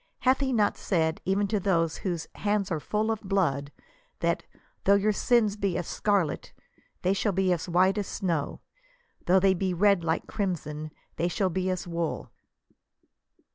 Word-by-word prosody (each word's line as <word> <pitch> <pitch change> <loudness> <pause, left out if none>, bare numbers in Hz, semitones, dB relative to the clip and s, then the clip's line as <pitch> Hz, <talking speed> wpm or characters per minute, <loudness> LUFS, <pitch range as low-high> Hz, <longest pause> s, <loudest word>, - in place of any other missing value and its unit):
Hath 260 +1 +3
he 270 -1 0
not 210 -4 +2
said, 160 -4 0
even 195 +2 +2
to 215 - +1
those 165 -4 +1
whose 175 -4 -3
"hands 205 -2 -1
are 160 - 0
full 215 +7 -1
of 220 - -3
blood," 165 -9 0 0.5
that - - +1
•< - - -25 0.3
though 200 - +6
your 205 +2 +2
sins 215 -1 +2
be 200 -4 -1
as - - -3
scarlet* 200 -7 0 0.5
they 185 - +3
shall 200 +1 0
be 185 0 +2
as 175 +1 -4
white 185 +4 +3
as 200 - -3
snow; 165 -7 -2 0.7
though 185 +2 +6
they 190 0 +4
be 185 0 -1
red 200 -1 +3
like 160 0 0
crim 195 -4 -1
son, 150 0 -7 0.3
they 170 - +1
shall 185 +1 0
be 185 +2 -1
as 185 -1 -2
wool 170 -2 -3
190 Hz, 175 wpm, -27 LUFS, 170-205 Hz, 0.7 s, though